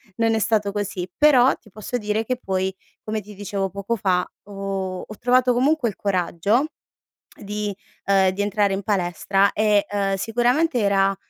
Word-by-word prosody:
non 225 -1 +2
è 220 - +1
stato 210 -2 +1
così. 200 -3 -3
Però 270 -4 +5
ti 215 - -21
posso 215 +5 -4
dire 210 -1 -1
che 255 +2 -1
poi 190 -3 -2 0.3
come 215 0 -3
ti 210 +1 -13
dicevo 195 -1 -3
poco 200 +4 -3
fa, 185 -4 +1 0.2
ho 195 -2 -4
ho 215 - -10
trovato 250 0 +3
comunque 270 +1 +2
il - - -8
coraggio 200 - +1 0.8
di 210 0 -3 0.3
ehm, 195 -1 +4
di 200 +2 -2
entrare 205 -1 +1
in 195 - -3
palestra 195 0 +1
e, 210 -1 +2
uhm, 200 -1 0
sicuramente 245 - +1
era, 195 -1 +2
205 Hz, 165 wpm, -22 LUFS, 195-225 Hz, 0.8 s, Però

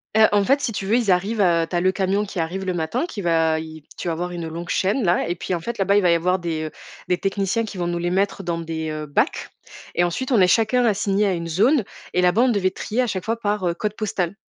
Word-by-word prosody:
Heu, 220 0 +7
en 205 -1 +3
fait, 275 +4 +3
si 240 - -1
tu 195 -2 -4
veux, 215 - +2
ils 225 -6 +2
arrivent, 200 +5 +1
heu, 170 -3 +3
tu - - -4
as 175 - +2
le 185 +1 +3
camion 195 +2 0
qui 195 -2 -6
arrive 175 +4 -2
le 185 - -1
matin 160 - -1
qui 225 -12 -6
va 165 -2 +2
i 160 -1 -9
tu - - -5
vas 170 - 0
avoir 175 +2 -3
une 170 -2 -5
longue 170 +2 -7
chaîne, 205 +7 +1
là 175 -1 +2
et 175 - -1
puis, 180 - -4
en 175 - 0
fait, 235 +8 -5
là-bas, 200 +1 +2
il - - +4
va 180 -2 +3
y - - +5
avoir 180 +3 +1
des, 165 -3 -3
heu, 155 - -6 0.4
des 180 - +2
techniciens 195 +4 -1
qui 205 - -8
vont 175 -1 -1
nous 175 0 -1
les 175 +1 -1
mettre 195 +1 0
dans 170 -2 -2
des, 160 -1 -4
heu, 155 0 -4
bacs 145 - 0 0.5
et 175 - +3
ensuite, 245 +10 -2
on 235 - +4
est 185 - +6
chacun 230 +5 +3
assigné 205 -1 +1
à 195 - +1
une 170 -1 -4
zone 225 - +3 0.3
et 180 - +2
là-bas, 180 +7 +4
on 260 - +3
devait 195 -5 +1
trier 220 +5 -2
à 250 - 0
chaque 185 -5 -3
fois 230 +1 -1
par, 205 -4 -1
heu, 170 - +1
code 210 +4 -3
postal 195 -4 -2
185 Hz, 290 wpm, -22 LUFS, 170-210 Hz, 0.5 s, Heu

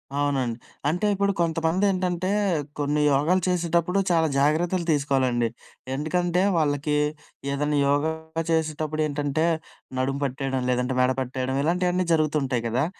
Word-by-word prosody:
అవునండి. 135 -5 0 0.3
అంటే 180 +7 0
ఇప్పుడు 200 0 +1
కొంతమంది 165 +3 +1
ఏంటంటే, 185 -1 -1 0.5
కొన్ని 145 +1 +1
యోగాలు 160 +7 +2
చేసేటప్పుడు 175 +1 +1
చాలా 165 -1 +3
జాగ్రత్తలు 170 +5 +1
తీసుకోవాలండి. 130 -5 +1 0.5
ఎందుకంటే, 175 +4 0 0.2
వాళ్ళకి 150 -1 +1 0.6
ఏదన్నా 145 +1 0
యోగ 145 +1 +2 0.5
చేసేటప్పుడు 155 -1 -1
ఏంటంటే, 145 +1 -1 0.5
నడుము 135 +2 -1
పట్టేయడం 135 -1 -2
లేదంటే, 125 +1 0
మెడ 125 0 +3
పట్టేయడం, 130 +1 -3
ఇలాంటియన్నీ 180 +2 +1
జరుగుతుంటాయి 150 -6 +1
కదా! 125 +6 +1
150 Hz, 115 wpm, -25 LUFS, 135-170 Hz, 0.6 s, చాలా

